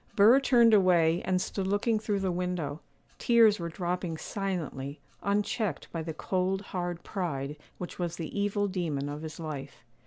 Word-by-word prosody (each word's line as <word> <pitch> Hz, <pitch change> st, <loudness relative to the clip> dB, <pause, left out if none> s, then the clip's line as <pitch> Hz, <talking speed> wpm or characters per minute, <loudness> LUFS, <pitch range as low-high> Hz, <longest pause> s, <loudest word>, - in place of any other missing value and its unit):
Burr 225 Hz, +6 st, +7 dB
turned 235 Hz, -4 st, +5 dB
away, 175 Hz, -4 st, +4 dB
and 185 Hz, 0 st, +2 dB
stood 190 Hz, +1 st, -2 dB
looking 210 Hz, +3 st, +1 dB
through 205 Hz, -2 st, -1 dB
the 190 Hz, -1 st, 0 dB
window; 175 Hz, -4 st, -2 dB, 0.4 s
tears 225 Hz, -4 st, +5 dB
were 170 Hz, -1 st, -3 dB
dropping 175 Hz, -1 st, -3 dB
silently, 160 Hz, -9 st, -4 dB, 0.2 s
unchecked 205 Hz, -, -1 dB
by 165 Hz, -, -3 dB
the 160 Hz, 0 st, -4 dB
cold, 185 Hz, +4 st, -1 dB
hard 175 Hz, -2 st, -3 dB
pride 150 Hz, -7 st, -3 dB, 0.2 s
which 180 Hz, -, -7 dB
was 175 Hz, -1 st, -2 dB
the 165 Hz, -3 st, -6 dB
evil 205 Hz, 0 st, +1 dB
demon 165 Hz, -7 st, -2 dB
of 145 Hz, +1 st, -5 dB
his 160 Hz, +1 st, -7 dB
life. 145 Hz, -4 st, -6 dB
180 Hz, 160 wpm, -29 LUFS, 160-200 Hz, 0.4 s, Burr